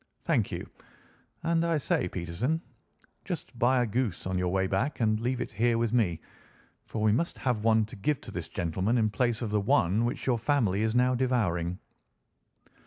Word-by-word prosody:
Thank - - +1
you. - - -5 0.8
And, 165 0 +2
I 170 -1 +2
say, 110 -9 0
Peterson, 95 - -2 0.6
just 160 - -6
buy 125 +1 +4
a - - +1
goose 115 -4 -2
on 95 0 -2
your 90 - 0
way 95 +1 +1
back 100 +10 -1
and 110 -2 +2
leave 125 +2 -1
it - - -4
here 115 +2 +2
with 115 -1 0
me, 95 -9 +2 0.7
for 110 - -3
we 110 - +4
must 165 +11 0
have 125 -5 -1
one 110 -1 +4
to 110 - -11
give 130 +8 0
to - - -9
this - - -5
gentleman 95 +7 0
in 110 -2 +2
place 120 +2 0
of 110 - -3
the 105 -1 +2
one 100 +2 +2
which 120 +2 -2
your 125 -3 +2
family 115 -6 +1
is 110 +1 0
now 125 +1 +4
devouring." 105 -9 0
115 Hz, 190 wpm, -29 LUFS, 100-125 Hz, 0.8 s, buy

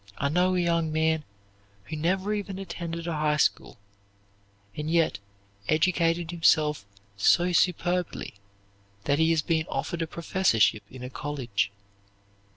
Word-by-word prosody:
I 140 - 0
know 180 +4 +2
a - - +2
young 170 -2 +1
man 160 -1 +1 0.6
who 155 - -6
never 185 +6 0
even 200 -2 -4
attended 170 -3 -5
a 170 - -2
high 150 -1 +1
school, 140 - 0 1.0
and 150 +1 -4
yet 165 -6 +2 0.5
educated 165 +1 +1
himself 150 -8 +2 0.3
so 175 - +4
superbly 180 0 0 0.7
that 145 +4 +1
he 160 0 +4
has 160 -2 +2
been 160 -1 0
offered 170 - -3
a 165 - -1
professorship 160 - +2
in 130 -1 -10
a 125 - -6
college. 120 -9 -2
165 Hz, 135 wpm, -27 LUFS, 150-175 Hz, 1.0 s, so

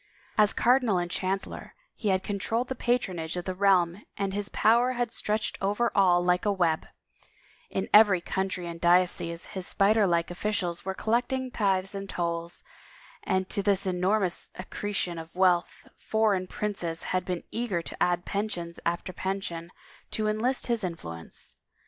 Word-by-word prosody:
As 210 -1 +5
cardinal 245 -5 +3
and 175 0 -2
chancellor 190 +1 -3 0.2
he 215 - -5
had 190 0 +2
controlled 225 +5 -1
the - - 0
patronage 185 -10 -1
of 175 - -4
the 185 - -2
realm 185 -1 +3 0.2
and 195 -1 -1
his 205 0 -2
power 240 +3 +3
had 240 -2 -1
stretched 215 -1 -2
over 205 +4 +1
all 180 -3 +4
like 180 0 +2
a 205 - +2
web; 170 -5 +1 0.8
in 190 - -2
every 210 -3 +7
county 185 0 -2
and 170 -1 -7
diocese 175 -1 +2
his 190 -2 -4
spider 205 +1 +3
like 170 -1 +1
offi 195 +4 -2
cials 180 -5 -1
were 190 0 -2
collecting 250 +4 0
tithes 195 -3 +1
and 195 0 -6
tolls, 170 0 -3 0.6
and 190 - 0
to 200 - +2
this 200 0 +1
enormous 185 +1 +1
accretion 185 -2 -3
of 160 +1 -10
wealth 180 -2 +2
foreign 210 -4 +1
princes 180 -6 -3
had 185 -1 +1
been 180 -2 -3
eager 215 -8 -2
to - - -7
add 175 0 +2
pension 195 -5 -2
after 170 +2 -2
pension 180 -3 -4 0.4
to 215 -1 -1
enlist 230 +5 +1
his 235 -3 0
influence. 85 - -7
190 Hz, 160 wpm, -28 LUFS, 175-210 Hz, 0.8 s, every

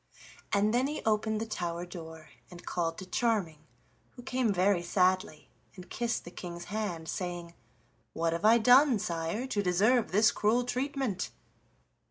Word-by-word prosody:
And 210 +2 +2
then 250 +3 +2
he 300 - -5
opened 220 0 +1
the 225 - -2
tower 175 -5 -4
door 160 -3 -10 0.2
and 175 -1 -12
called 165 -2 -2
to 190 - -7
Charming, 190 -6 0 0.6
who 245 - -11
came 255 -3 0
very 190 -1 +2
sadly 180 -3 0 0.3
and 180 -1 -12
kissed 235 0 -2
the 175 - -9
King's 175 -1 -7
hand, 180 -7 -3
saying: 175 -2 -5 0.6
"What 165 0 0
have 170 - -4
I 220 +2 +7
done, 250 +3 +6
sire, 175 +3 -3
to 215 -6 -1
deserve 210 +6 +2
this 215 +4 +5
cruel 235 +3 +1
treatment?" 255 -4 -2
200 Hz, 155 wpm, -30 LUFS, 175-230 Hz, 0.6 s, I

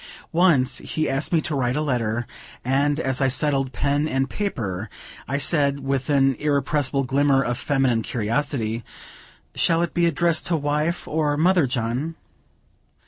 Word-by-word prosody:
Once 160 -7 +3
he 155 -1 -2
asked 135 +2 -1
me 165 -2 +3
to 155 - -3
write 125 -2 0
a 150 - 0
letter, 120 -5 -1 0.4
and 140 +3 +1
as 130 -3 -1
I 135 - +4
settled 135 -1 +1
pen 145 +4 0
and 135 -2 0
paper, 110 - -3 0.4
I 140 - -1
said, 140 -2 +1
with 135 +1 -2
an 135 -2 +3
irrepressible 145 -1 +1
glimmer 135 +1 +2
of 120 0 -2
feminine 135 -6 +1
curiosity, 115 0 -2 0.7
"Shall 165 0 +2
it 170 - -3
be 170 -1 +2
addressed 170 +1 +1
to 170 - +1
wife, 150 +4 -1
or 150 -1 0
mother, 175 -2 +3
John?" 125 +6 -2
140 Hz, 150 wpm, -23 LUFS, 130-150 Hz, 0.7 s, I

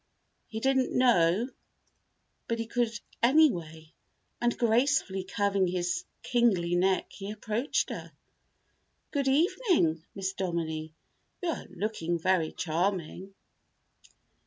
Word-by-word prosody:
He 220 - -5
didn't 265 +1 +1
know 225 -3 +4 1.0
but 230 - -1
he 230 - -2
could, 240 0 0 0.3
anyway, 175 - +2 0.5
and 240 0 +1
gracefully 235 -4 +2
curving 200 0 +1
his 180 - -1 0.2
kingly 205 -9 +2
neck 185 +2 +1
he 195 0 -7
approached 215 +5 -1
her. - - -7 1.0
"Good 280 -2 0
evening, 295 - +2
Miss 190 -1 -2
Dominie. 165 -4 -3 0.5
You 350 - 0
are 325 - -4
looking 180 -2 -2
very 170 -1 +1
charming." 185 +2 -2
195 Hz, 105 wpm, -29 LUFS, 175-240 Hz, 1.0 s, know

